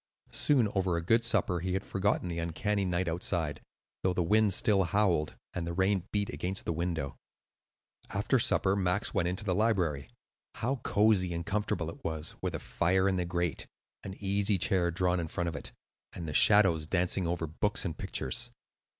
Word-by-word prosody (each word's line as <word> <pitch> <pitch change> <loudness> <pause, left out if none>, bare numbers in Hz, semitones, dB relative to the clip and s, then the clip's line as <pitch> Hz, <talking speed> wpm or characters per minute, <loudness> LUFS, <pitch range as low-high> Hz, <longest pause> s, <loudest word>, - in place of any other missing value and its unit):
Soon, 130 -7 +3
over 95 -3 0
a 85 - -3
good 115 +5 +4
supper, 95 -6 +1
he 90 +2 -2
had 95 +1 -1
forgotten 100 -1 0
the 85 -1 -3
uncanny 95 +5 -1
night 90 0 0
outside, 80 -2 -1 0.4
though 95 - +1
the 90 - +1
wind 105 +3 +3
still 100 +1 +3
howled 85 -4 +1 0.2
and 85 -1 -3
the 85 - -3
rain 95 +1 +1
beat 100 -1 0
against 95 +2 -2
the - - -1
window. 80 -5 -3 0.9
After - - +1
supper 95 +1 +3
Max 95 +1 0
went 95 -5 +1
into 90 +3 -3
the 95 -3 0
library. 90 -9 0 0.5
How 125 +5 -1
cosy 100 -6 +2
and 85 - -4
comfortable 100 -5 -2
it - - -15
was, 80 -1 -1
with - - -2
a - - -3
fire 95 +3 +1
in 95 -1 +1
the 90 - -1
grate, 85 -2 -2 0.4
an 95 -1 -7
easy 100 0 +1
chair 90 0 +2
drawn 90 +1 0
in 85 - -3
front 85 +2 -2
of 80 - -7
it, - - -6 0.4
and 85 -2 -6
the 75 - -4
shadows 85 -5 +5
dancing 90 +1 +1
over 85 -1 -1
books 100 +8 -2
and 85 -4 -3
pictures! 65 - -2
90 Hz, 185 wpm, -30 LUFS, 85-100 Hz, 0.9 s, shadows